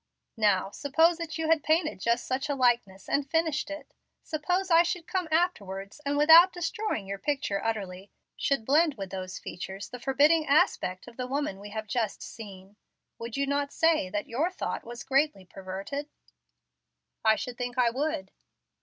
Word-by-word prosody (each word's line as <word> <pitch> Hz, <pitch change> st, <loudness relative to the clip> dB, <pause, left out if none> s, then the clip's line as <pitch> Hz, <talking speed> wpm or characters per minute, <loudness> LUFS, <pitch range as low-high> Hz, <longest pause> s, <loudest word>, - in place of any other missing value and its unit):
"Now, 200 Hz, -3 st, +2 dB
suppose 325 Hz, +7 st, +2 dB
that 330 Hz, -1 st, -5 dB
you 320 Hz, -1 st, -1 dB
had 320 Hz, -1 st, +4 dB
painted 315 Hz, -, +1 dB
just 235 Hz, +4 st, 0 dB
such 260 Hz, +2 st, -2 dB
a 285 Hz, -, 0 dB
likeness 235 Hz, -7 st, +1 dB
and 280 Hz, -1 st, 0 dB
finished 320 Hz, -2 st, 0 dB
it. 295 Hz, +1 st, -8 dB, 0.3 s
Suppose 360 Hz, +4 st, -1 dB
I 330 Hz, 0 st, +8 dB
should 350 Hz, -1 st, -2 dB
come 370 Hz, -2 st, -2 dB
afterwards, 205 Hz, -, -1 dB
and, 285 Hz, 0 st, -1 dB
without 325 Hz, +5 st, +8 dB
destroying 355 Hz, -, -3 dB
your 195 Hz, 0 st, -5 dB
picture 240 Hz, -6 st, -1 dB
utterly, 200 Hz, -4 st, -3 dB, 0.3 s
should 275 Hz, -6 st, 0 dB
blend 300 Hz, +3 st, +3 dB
with 195 Hz, -3 st, -7 dB
those 185 Hz, -1 st, -5 dB
features 190 Hz, +2 st, -7 dB
the 250 Hz, -, -8 dB
forbidding 290 Hz, +5 st, +3 dB
aspect 280 Hz, -, +2 dB
of 235 Hz, -, -13 dB
the 250 Hz, -1 st, -3 dB
woman 270 Hz, -7 st, -2 dB
we 205 Hz, +1 st, -9 dB
have 220 Hz, +1 st, -5 dB
just 220 Hz, -1 st, -2 dB
seen, 200 Hz, -2 st, -11 dB, 0.4 s
would 230 Hz, +2 st, -6 dB
you 280 Hz, -, +1 dB
not 280 Hz, 0 st, -1 dB
say 325 Hz, -, +2 dB
that 205 Hz, +1 st, -2 dB
your 280 Hz, +9 st, 0 dB
thought 370 Hz, -, -4 dB
was 240 Hz, +1 st, -8 dB
greatly 270 Hz, -7 st, +1 dB
perverted?" 195 Hz, +11 st, -6 dB, 1.1 s
"I 220 Hz, 0 st, +5 dB
should 245 Hz, +2 st, -6 dB
think 245 Hz, 0 st, -4 dB
I 240 Hz, -2 st, +4 dB
would." 295 Hz, +4 st, -2 dB
270 Hz, 170 wpm, -28 LUFS, 205-315 Hz, 1.1 s, I